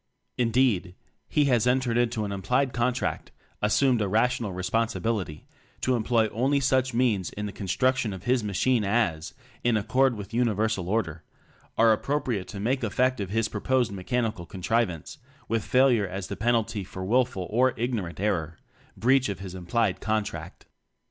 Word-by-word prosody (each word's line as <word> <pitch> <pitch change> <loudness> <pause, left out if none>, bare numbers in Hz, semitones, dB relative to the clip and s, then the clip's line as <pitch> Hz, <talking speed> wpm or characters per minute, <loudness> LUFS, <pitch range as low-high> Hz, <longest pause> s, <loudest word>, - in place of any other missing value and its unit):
Indeed, 115 -7 +1 0.3
he 150 - +3
has 125 -3 +2
en 125 +1 +4
tered 120 -3 -2
into 120 -2 +1
an 100 - -4
implied 125 +7 0
contract 125 +1 -1 0.3
as 105 0 +2
sumed 130 -5 +3
a 105 - +1
rational 115 +1 +1
responsibility 105 -2 -2 0.4
to 130 - +2
em 120 - 0
ploy 115 0 +2
only 135 +7 +1
such 130 -1 +2
means 110 -7 +1
in 105 - -5
the 100 - -5
construc 130 +7 +1
tion 115 -5 -1
of 95 -1 -8
his 125 0 +1
machine 110 +3 +1
as 100 -7 0 0.3
(in 120 -2 +3
accord 130 +4 +2
with 105 +1 -8
Universal 110 -5 0
Order) 90 -7 -1 0.6
are 115 -1 +6
appropriate 120 -5 -2
to 100 - -7
make 125 +5 0
effective 125 -2 0
his 110 +2 0
proposed 120 +2 0
mechanical 105 -2 -2
contrivance; 95 - -2 0.3
with 115 -1 0
failure 125 -5 +3
as 95 +1 -6
the - - -3
pen 120 +3 +2
alty 105 -2 -1
for 95 0 -7
wilful 120 -3 +1
or 125 +3 +3
ignorant 110 -9 -3
error 85 -6 -1 0.4
breach 125 +4 +3
of 100 - -3
his 95 -2 -8
implied 95 +3 0
contract. 110 -1 -3
115 Hz, 165 wpm, -26 LUFS, 100-125 Hz, 0.6 s, are